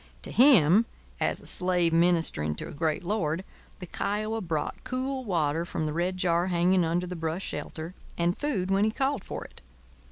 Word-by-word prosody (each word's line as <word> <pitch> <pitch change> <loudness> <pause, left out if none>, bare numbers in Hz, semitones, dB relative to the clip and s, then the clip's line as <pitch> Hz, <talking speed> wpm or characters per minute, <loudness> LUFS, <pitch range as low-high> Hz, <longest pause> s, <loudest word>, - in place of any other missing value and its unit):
To - - -5
him, 230 - +6 0.3
as - - 0
a - - -15
slave 180 -2 +2
ministering 165 - +3
to - - -6
a - - -8
great 160 +3 -1
lord, 180 -3 -1 0.3
the 180 - -8
Kiowa 215 +5 -2
brought 160 -5 -3
cool 260 +1 -3
water 165 -6 0
from 160 -2 -3
the 150 - -2
red 180 +3 -1
jar 175 -1 +1
hanging 180 +1 +2
under 170 +2 0
the 180 0 -6
brush 165 +2 -3
shelter, 165 +2 -6 0.2
and 175 +1 +1
food 195 -11 -2
when 195 +1 +3
he 215 - +3
called 270 +5 -1
for - - -6
it. - - -15
180 Hz, 185 wpm, -27 LUFS, 165-205 Hz, 0.3 s, him